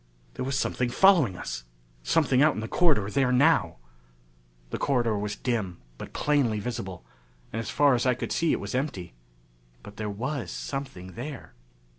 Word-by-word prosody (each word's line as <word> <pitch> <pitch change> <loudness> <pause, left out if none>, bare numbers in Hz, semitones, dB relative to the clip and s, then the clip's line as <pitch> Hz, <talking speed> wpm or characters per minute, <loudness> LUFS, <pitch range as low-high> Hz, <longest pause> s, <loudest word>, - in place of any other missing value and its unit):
There 130 - -4
was 135 +1 -1
something 125 -2 0
following 155 - +4
us! - - -5 0.4
Something 125 - +2
out 150 +1 +5
in - - -3
the 110 - -4
corridor 145 - +3
there 130 +2 +2
now! 125 - +4 1.0
The - - -3
corridor 120 -5 +1
was 105 0 -3
dim, 110 -8 -2 0.2
but - - -7
plainly 135 -8 +1
visible, 100 -5 -5 0.5
and 110 - -2
as 115 - -4
far 145 -2 +4
as 120 +1 +1
I 125 - +3
could - - -5
see 165 -1 +2
it - - +1
was 100 0 -5
empty. 125 - -3 0.7
But 105 0 -12
there 105 -1 -3
was 125 +6 -3
something 130 -10 -6
there. 135 +3 -7
120 Hz, 170 wpm, -27 LUFS, 105-140 Hz, 1.0 s, out